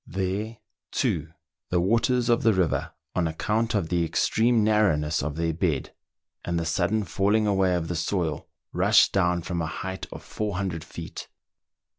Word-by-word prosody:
There, 100 Hz, +5 st, -3 dB, 0.3 s
too, 75 Hz, -1 st, 0 dB, 0.4 s
the 90 Hz, -, +2 dB
waters 115 Hz, +6 st, +2 dB
of 120 Hz, -1 st, +3 dB
the 115 Hz, -1 st, +4 dB
river, 85 Hz, -3 st, 0 dB, 0.2 s
on 90 Hz, -2 st, +1 dB
account 110 Hz, +8 st, -1 dB
of 90 Hz, -6 st, 0 dB
the 85 Hz, -1 st, +1 dB
extreme 110 Hz, +6 st, +2 dB
narrouTiess 85 Hz, -9 st, +2 dB
of 75 Hz, +1 st, -3 dB
their 80 Hz, 0 st, 0 dB
bed, 80 Hz, -4 st, -1 dB, 0.5 s
and 85 Hz, -1 st, -1 dB
the 85 Hz, -, -2 dB
sudden 95 Hz, +6 st, +1 dB
falling 100 Hz, +3 st, +1 dB
away 95 Hz, -3 st, +2 dB
of 85 Hz, -2 st, -2 dB
the 85 Hz, -, -3 dB
soil, 85 Hz, -1 st, -2 dB, 0.3 s
rushed -, -, +5 dB
down 90 Hz, -3 st, +2 dB
from 85 Hz, -1 st, -2 dB
a 80 Hz, -, -2 dB
height 95 Hz, +3 st, -5 dB
of -, -, -9 dB
400 95 Hz, -6 st, -3 dB
feet. -, -, -8 dB
90 Hz, 160 wpm, -26 LUFS, 85-105 Hz, 0.5 s, rushed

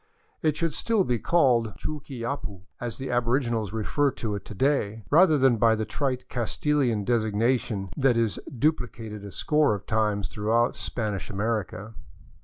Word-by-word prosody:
It 155 Hz, -1 st, +1 dB
should 165 Hz, -3 st, 0 dB
still 225 Hz, +2 st, +1 dB
be 125 Hz, -8 st, 0 dB
called 120 Hz, -, +2 dB
Chuquiyapu, 120 Hz, -8 st, -5 dB, 0.2 s
as 120 Hz, -2 st, -4 dB
the 135 Hz, -, -4 dB
aboriginals 120 Hz, -3 st, 0 dB
refer 115 Hz, +6 st, +1 dB
to 115 Hz, -4 st, -4 dB
it 100 Hz, -1 st, -4 dB
to 105 Hz, -, -9 dB
day, 115 Hz, -4 st, 0 dB
rather 160 Hz, 0 st, +6 dB
than 130 Hz, -3 st, +4 dB
by 115 Hz, 0 st, +4 dB
the 110 Hz, 0 st, -2 dB
trite 130 Hz, +2 st, -2 dB
Castilian 125 Hz, -1 st, 0 dB
designation 110 Hz, -2 st, 0 dB
that 130 Hz, -3 st, +3 dB
is 115 Hz, -4 st, 0 dB
duplicated 115 Hz, -6 st, -2 dB
a 100 Hz, -, -8 dB
score 150 Hz, +1 st, +2 dB
of 100 Hz, -, -9 dB
times 105 Hz, -2 st, 0 dB
throughout 115 Hz, +3 st, +1 dB
Spanish 105 Hz, -5 st, -3 dB
America. 105 Hz, 0 st, -3 dB
115 Hz, 150 wpm, -26 LUFS, 105-135 Hz, 0.2 s, rather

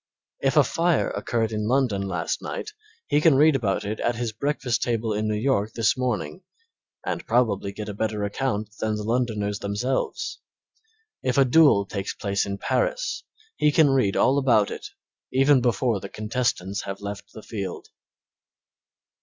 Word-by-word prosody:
If -, -, +1 dB
a -, -, +8 dB
fire 170 Hz, -2 st, +1 dB
occurred 115 Hz, -2 st, -1 dB
in 105 Hz, -1 st, -2 dB
London 125 Hz, -5 st, +1 dB
last 90 Hz, -4 st, -2 dB
night 430 Hz, -, -5 dB, 0.3 s
he 145 Hz, -, +2 dB
can 155 Hz, -3 st, +5 dB
read 150 Hz, +2 st, +5 dB
about 105 Hz, -5 st, 0 dB
it 105 Hz, +2 st, -3 dB
at 120 Hz, -, 0 dB
his 120 Hz, -1 st, -2 dB
breakfast 125 Hz, 0 st, -1 dB
table 115 Hz, -2 st, 0 dB
in 105 Hz, +1 st, -1 dB
New 105 Hz, -, 0 dB
York 110 Hz, -3 st, 0 dB
this 115 Hz, -2 st, +2 dB
morning, 125 Hz, -, -2 dB, 0.6 s
and -, -, -2 dB
probably 110 Hz, -5 st, +1 dB
get 105 Hz, +1 st, -7 dB
a 105 Hz, -, -4 dB
better 105 Hz, 0 st, -2 dB
account 105 Hz, 0 st, -2 dB
than 110 Hz, -1 st, 0 dB
the 105 Hz, -, -4 dB
Londoners 110 Hz, -3 st, -1 dB
themselves. 125 Hz, -, -2 dB, 0.8 s
If 125 Hz, 0 st, -1 dB
a 135 Hz, -, +6 dB
duel 130 Hz, -7 st, +5 dB
takes 100 Hz, 0 st, -4 dB
place 100 Hz, -1 st, -1 dB
in 100 Hz, 0 st, -3 dB
Paris -, -, -1 dB, 0.4 s
he 150 Hz, -, +3 dB
can 145 Hz, -2 st, +5 dB
read 125 Hz, -8 st, +2 dB
all 140 Hz, +2 st, +4 dB
about 120 Hz, -7 st, +3 dB
it -, -, -6 dB, 0.4 s
even 135 Hz, 0 st, +4 dB
before 115 Hz, -2 st, +1 dB
the 100 Hz, -, -8 dB
contestants 110 Hz, -3 st, -2 dB
have 100 Hz, 0 st, -6 dB
left 100 Hz, 0 st, -7 dB
the 110 Hz, -, -10 dB
field. 100 Hz, -5 st, -6 dB
110 Hz, 165 wpm, -25 LUFS, 100-130 Hz, 0.8 s, a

